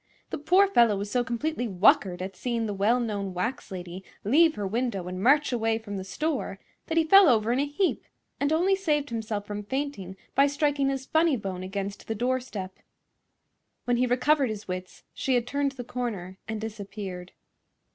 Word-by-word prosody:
The - - -3
poor 365 +7 +4
fellow 235 - +4
was 200 +1 -4
so 245 -1 +2
completely 245 +2 -2
whuckered 185 -2 +3
at 190 0 -6
seeing 235 +3 -2
the 210 - -2
well 210 +5 +2
known 200 -5 -3
wax 235 +8 -3
lady 180 -1 -7 0.2
leave 310 +9 +4
her 205 - -3
window 210 -3 -2
and 185 +1 -5
march 285 +7 +4
away 225 -2 +1
from 215 -3 -7
the 190 - -4
store 260 - -2 0.3
that 325 - -2
he 325 - +5
fell 390 +2 +7
over 225 -2 +3
in 255 - +1
a 285 - +1
heap 345 +6 0 0.4
and 285 +1 +1
only 360 +5 +3
saved 300 -8 0
himself 220 -3 -3
from 205 0 -5
fainting 210 -7 -4 0.2
by 275 +1 +5
striking 285 -1 +1
his 270 -1 -3
funny 320 -2 +3
bone 190 -3 -5
against 195 +1 -5
the 225 - -2
doorstep. 240 -5 -3 1.1
When 245 -1 +2
he 250 +1 +2
recovered 265 +2 +2
his 215 -1 -6
wits 185 0 -6
she 265 - 0
had 240 -1 +1
turned 280 +1 -1
the 255 -2 -7
corner 210 -7 -5
and 220 0 -3
disappeared. 200 -4 -7
235 Hz, 185 wpm, -27 LUFS, 200-280 Hz, 1.1 s, fell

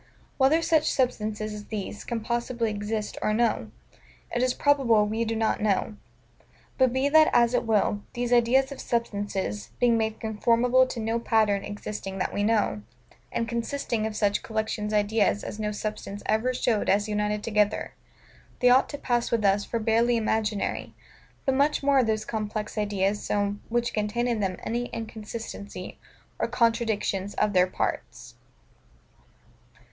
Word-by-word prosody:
Whether 295 +5 +4
such 315 -2 +3
substances 215 -4 -1
as 210 0 -8
these 210 -1 -5
can 235 -2 -3
possibly 235 0 -1
exist 210 +1 -3
or 215 - +1
no, 235 0 +1 0.7
it 240 - +1
is 255 0 +1
probable 255 -7 +3
we 220 +2 -1
do 225 0 -2
not 220 -1 0
know: 210 0 0 0.8
but 260 -2 +4
be 260 +2 +1
that 310 +2 +6
as 235 0 +4
it 245 - 0
will, 210 -1 +2
these 245 0 0
ideas 255 +3 +4
of 275 - -7
substances, 200 - -2
being 235 -2 +4
made 220 0 -2
conformable 235 +4 +3
to 245 - -5
no 225 +1 -1
pattern 215 -4 +2
existing 205 -2 -6
that 185 - -2
we 205 - -1
know; 210 - +1 0.5
and 230 - -1
consisting 235 -1 -2
of 215 - -6
such 205 -1 +1
collections 220 -1 -3
of 210 - +3
ideas 205 0 +1
as 210 - -6
no 210 -1 -1
substance 210 -1 -5
ever 220 +4 +1
showed 240 -3 0
us 205 +2 +3
united 210 0 -1
together, 210 -2 0 0.7
they 250 0 +5
ought 255 +2 +5
to 290 - -5
pass 240 -3 0
with 230 -3 0
us 200 +1 +3
for 235 - -2
barely 230 +2 +2
imaginary: 220 -2 -1 0.5
but 270 - +2
much 285 +2 +2
more 280 -1 +4
are - - +4
those 215 -1 -1
complex 215 -1 -4
ideas 205 -1 0
so, 205 0 0
which 235 0 0
contain 215 +3 -1
in 235 -3 0
them 190 -3 -1
any 240 +2 -2
inconsistency 220 -3 -7 0.4
or - - +1
contradiction 230 -5 0
of 210 -1 +1
their 180 0 +4
parts. 120 -8 -4
220 Hz, 160 wpm, -26 LUFS, 210-240 Hz, 0.8 s, that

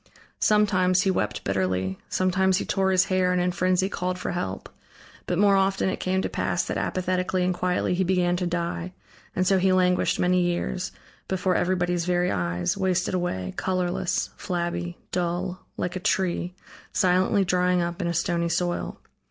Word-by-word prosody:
Sometimes, 185 -3 +3
he 195 - +2
wept 105 - -2
bitterly, 95 0 -1
sometimes 185 0 +2
he - - -2
tore 190 -1 +1
his 185 -1 +4
hair 185 -1 +1
and 180 - +1
in 180 0 +1
frenzy 185 +1 +1
called 185 -2 -2
for - - -3
help; 100 - -4 0.6
but 175 - 0
more 200 +1 +5
often 195 0 +2
it - - -3
came 190 +1 0
to - - 0
pass - - -1
that - - -3
apathetically 185 0 0
and 185 - +1
quietly 180 0 0
he 185 +1 +1
began 180 -1 +2
to 180 -1 -1
die, 175 +1 -3 0.4
and 185 - +1
so 190 0 +4
he 190 +1 +3
languished 180 -1 +2
many 180 0 +3
years, 175 +1 -1 0.4
before 190 -1 0
everybody's 175 -1 0
very 180 0 +1
eyes, 90 -2 -1
wasted 190 -1 0
away, 95 - -2
colorless, 180 -1 -1
flabby, 175 0 -3
dull, 180 +1 -2
like 180 +1 -2
a - - -2
tree, 180 -1 0 0.4
silently 185 +1 +3
drying 180 0 +2
up 170 +2 -3
in 175 - -1
a 170 - 0
stony 170 0 0
soil. 175 +1 -2
180 Hz, 170 wpm, -25 LUFS, 175-185 Hz, 0.6 s, more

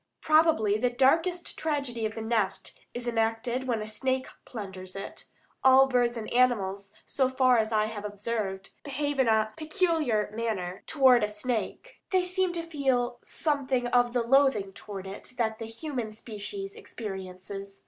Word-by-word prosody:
Probably 310 -10 +4
the 250 +2 +2
darkest 325 +8 +2
tragedy 275 -8 -1
of 215 - -9
the 225 - -4
nest 220 -4 -1 0.2
is 245 0 -5
enacted 235 +2 0
when 230 -4 0
a - - -6
snake 260 +5 -1 0.2
plunders 190 -5 -7
it. 195 - -7 0.4
All 265 0 +8
birds 245 -2 +1
and 220 - -5
animals, 200 -6 +2
so 265 -2 +1
far 255 -2 +4
I 220 -1 +2
have 215 -1 -5
observed, 205 -2 -3
behave 290 0 -2
in 260 - +4
a 220 -1 +2
peculiar 315 - 0
manner 205 -5 -3
toward 260 -6 +5
a 210 - +1
snake. 220 +2 -4
They 370 -1 +2
seem 370 0 0
to 335 -1 -3
feel 265 -6 0
something 275 -5 0
of 245 -1 +3
the 245 -2 +1
loathing 235 -6 +3
toward 195 -2 -8
it 195 +6 -7
that 220 -2 0
the 225 - -4
human 235 -2 -5
species 235 - -6
experiences. 195 - -7
240 Hz, 155 wpm, -28 LUFS, 215-270 Hz, 0.4 s, All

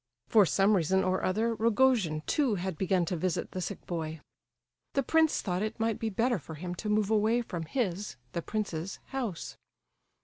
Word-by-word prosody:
For 210 -5 +6
some 195 +4 +3
reason 190 +2 +2
or 185 0 +1
other, 220 +5 +1
Rogojin 225 -8 +2
too 270 -8 +2
had 185 -1 -3
begun 185 +1 +1
to 180 - -2
visit 175 +1 -1
the 185 - -4
sick 190 +3 -5
boy. 160 -2 -4 0.7
The 275 - +2
prince 320 +3 +3
thought 180 -2 -1
it 215 +1 -3
might 225 0 0
be 225 -1 -1
better 230 +2 +1
for 160 +2 -9
him 175 +3 -5
to 210 - -3
move 210 0 +2
away 220 +3 +3
from 170 -7 -5
his 205 - -2 0.2
(the 170 - -2
prince's) 195 -3 -3
house. 240 -11 -4
200 Hz, 180 wpm, -30 LUFS, 175-225 Hz, 0.7 s, For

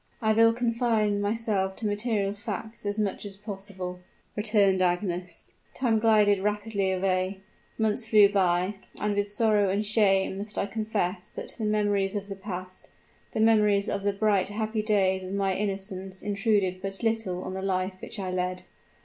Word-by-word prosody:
"I 220 -2 +2
will 230 +1 +6
confine 230 -3 +1
myself 205 -3 0
to 225 - -5
material 205 -1 0
facts 210 +1 -6
as 205 +1 -1
much 210 -3 -1
as 200 -2 -5
possible," 195 -3 -6 0.4
returned 205 -3 +3
Agnes. 180 -1 -2 0.2
"Time 235 -4 +2
glided 210 -3 +4
rapidly 205 -1 -1
away; 185 0 0 0.4
months 220 +1 +1
flew 210 -2 +7
by, 190 0 +1 0.2
and 210 -1 0
with 205 0 0
sorrow 210 -2 +3
and 200 +3 0
shame 195 -3 +2
must 205 +1 -4
I - - +1
confess 200 -3 -2
that - - -7
the 220 - -4
memories 205 -2 +1
of 205 0 -4
the 195 - -4
past, 185 -2 -7 0.4
the - - -2
memories 210 -2 +4
of 200 - -2
the 205 +1 +1
bright, 200 -2 +1
happy 215 +1 -2
days 195 -3 +2
of 185 +1 -6
my 195 -1 +1
innocence 195 -1 -4
intruded 200 -2 0
but 195 +2 -5
little 220 -5 -1
on - - -5
the 190 - -4
life 185 0 -2
which - - -7
I 190 -2 -3
led. 180 0 -2
205 Hz, 165 wpm, -27 LUFS, 190-215 Hz, 0.4 s, flew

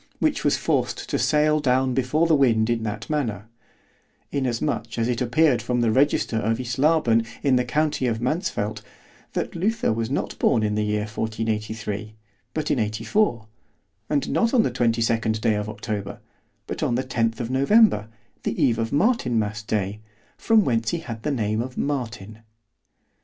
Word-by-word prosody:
which - - 0
was - - +2
forced - - -1
to - - -1
sail 150 0 +3
down 130 -2 +2
before 135 +6 +1
the 165 - +3
wind 120 -6 +3
in 115 -1 0
that 105 -1 -4
manner—inasmuch 120 +1 -4
as 115 0 +1
it 125 -1 -1
appeared 125 +2 +3
from 125 -1 -1
the 115 -2 +2
register 130 -2 +2
of 110 +2 0
Islaben 125 -1 +2 0.2
in 135 -2 +4
the 125 - +2
county 145 +1 0
of 115 -2 -1
Mansfelt, 125 - -2 0.5
that - - -3
Luther 210 - 0
was 115 +1 -2
not 140 - -3
born 110 - +3
in 105 0 0
the 105 0 0
year 105 0 0
1483, 110 -1 -3 0.4
but 155 - -1
in 130 - +1
84; 110 - 0 0.6
and 145 -2 0
not 230 +2 +2
on 230 - +5
the - - 0
22d 115 -2 +1
day 110 - +2
of 105 0 -2
October, 105 -2 -5 0.5
but - - -5
on 120 - +1
the 130 - 0
10th 115 -3 -1
of 120 0 -3
November, 140 - +4 0.3
the - - -3
eve 115 -1 +3
of 115 0 -1
Martinmas 120 - +1
day, 105 -2 -2 0.4
from 225 -2 +3
whence 115 -3 +1
he 170 - -1
had 115 -7 -7
the 150 - -2
name 110 -5 0
of 130 +1 -6
_Martin. 115 -6 -4
120 Hz, 165 wpm, -24 LUFS, 110-140 Hz, 0.6 s, on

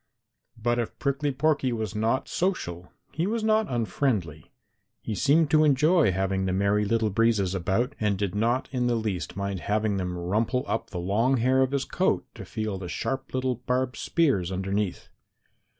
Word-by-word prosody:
But 120 +1 0
if 115 - -3
Prickly 140 +1 0
Porky 140 -1 +1
was 110 -3 -3
not 115 +5 0
social 90 - -2 0.2
he 165 +5 -1
was 225 +1 -1
not 220 0 +3
unfriendly. 105 - -1 0.5
He 110 - -3
seemed 150 +7 +3
to 155 0 +5
enjoy 150 - +4
having 95 +1 0
the 95 - 0
Merry 100 +2 +2
Little 110 0 +1
Breezes 105 -3 +2
about, 95 +9 0
and 105 -2 +1
did 100 -2 -2
not 115 +5 +1
in 125 -2 0
the 120 - +2
least 100 -9 -3
mind 100 -1 -2
having 105 +1 0
them 90 -1 -3
rumple 110 +8 0
up 115 - -2
the 90 - -6
long 110 +9 +1
hair 130 +3 +3
of 130 - +3
his 140 -1 -1
coat - - 0
to - - -9
feel 110 -3 -3
the 90 -2 -6
sharp 135 +9 -3
little 130 -2 0
barbed 125 0 0
spears 130 - +1
underneath. 95 +1 -2
115 Hz, 175 wpm, -26 LUFS, 95-130 Hz, 0.5 s, to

